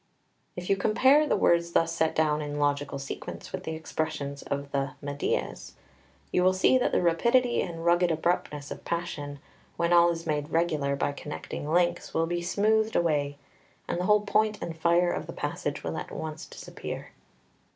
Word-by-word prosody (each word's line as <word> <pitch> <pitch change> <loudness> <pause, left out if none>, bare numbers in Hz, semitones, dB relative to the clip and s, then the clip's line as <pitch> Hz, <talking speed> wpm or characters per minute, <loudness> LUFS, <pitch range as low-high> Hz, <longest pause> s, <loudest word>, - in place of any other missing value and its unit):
If 180 0 -6
you 195 - +3
compare 265 +9 +4
the 210 - +2
words 170 -2 +3
thus 165 0 +3
set 160 -1 +1
down 155 -1 +2
in 145 0 -4
logical 145 -1 0
sequence 135 0 -7
with - - -5
the 160 - -3
expressions 145 -3 -3
of 140 0 -4
the 140 0 -1
"Meidias," 145 0 -3 0.6
you 180 - +2
will 185 0 +4
see 190 +7 +4
that - - +1
the - - +2
rapidity 235 +9 +3
and 165 -2 -5
rugged 175 +1 +4
abruptness 155 -3 -1
of - - -7
passion, 155 -4 -4 0.4
when 170 +1 +2
all 170 0 +7
is 165 -1 -3
made 150 -1 -1
regular 155 -4 +1
by 140 - 0
connecting 150 +1 -6
links, 175 0 +1
will 165 - +3
be 175 +1 -2
smoothed 215 +5 +1
away, 145 -4 +1 0.5
and - - -2
the 180 - -1
whole 210 +1 +5
point 210 +1 +1
and 165 - -5
fire 170 +2 +3
of - - -4
the - - -6
passage - - -3
will - - -3
at - - -5
once 155 0 -6
disappear. - - -7
165 Hz, 180 wpm, -28 LUFS, 150-180 Hz, 0.6 s, all